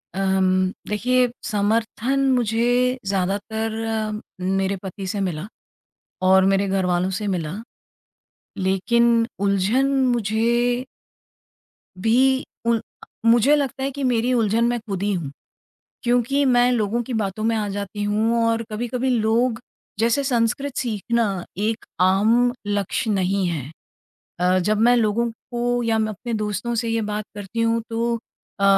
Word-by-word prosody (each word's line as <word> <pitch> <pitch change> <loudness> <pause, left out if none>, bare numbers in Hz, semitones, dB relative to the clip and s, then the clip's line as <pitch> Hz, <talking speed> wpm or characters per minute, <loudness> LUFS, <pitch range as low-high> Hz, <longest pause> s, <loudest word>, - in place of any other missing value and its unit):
अम 190 -1 +1 0.4
देखिए 250 +4 +2 0.2
समर्थन 225 +5 0 0.2
मुझे 245 +2 +1
ज़्यादातर 205 +4 -1 0.4
म 210 - -5 0.4
मेरे 195 +1 0
पति 190 +1 -6
से 200 - -2
मिला 165 +2 -5 0.8
और 190 0 +6
मेरे 195 0 +2
घर 190 -1 0
वालों 180 +1 +1
से 210 - -3
मिला। 170 -4 -2 1.0
लेक़िन 230 +5 +2 0.2
उलझन 200 +7 +2 0.3
मुझे 235 +3 +1 1.1
भी 260 +5 +3 0.2
उल 230 -1 +2 0.4
मुझे 240 +5 +5
लगता 270 -2 -2
है 275 - -1
कि 280 +1 -5
मेरी 250 0 +1
उलझन 230 0 +2
मैं 240 0 0
खुद 200 -4 -5
ही 205 0 +1
हूँ, 155 -6 -3 0.7
क्योंकि 245 +3 +2
मैं 245 -1 +4
लोगों 235 0 0
की 245 +1 -5
बातों 215 0 -2
में 230 0 +2
आ 210 -1 -1
जाती 200 +1 -4
हूँ 225 +3 +1
और 230 0 +1
कभी-कभी 240 +4 -2
लोग, 230 +1 +2 0.4
जैसे 235 +5 +2
संस्कृत 255 +2 0
सीखना 220 -4 -1
एक 220 +2 -1 0.2
आम 220 +7 +4
लक्ष्य 205 +2 -1
नहीं 190 -1 +1
है। 150 -4 -4 0.7
अ, 180 +1 +3
जब 210 +4 +1
मैं 245 +2 +5
लोगों 230 +1 +1
को 240 +1 -2
या 225 -1 +1
मैं 215 0 0
अपने 235 +4 -5
दोस्तों 210 +2 -2
से 230 0 -1
ये 225 0 0
बात 210 0 -3
करती 205 +3 -5
हूँ 230 0 +1
तो 230 +1 0 0.4
अ, - - +2
225 Hz, 140 wpm, -22 LUFS, 200-240 Hz, 1.1 s, और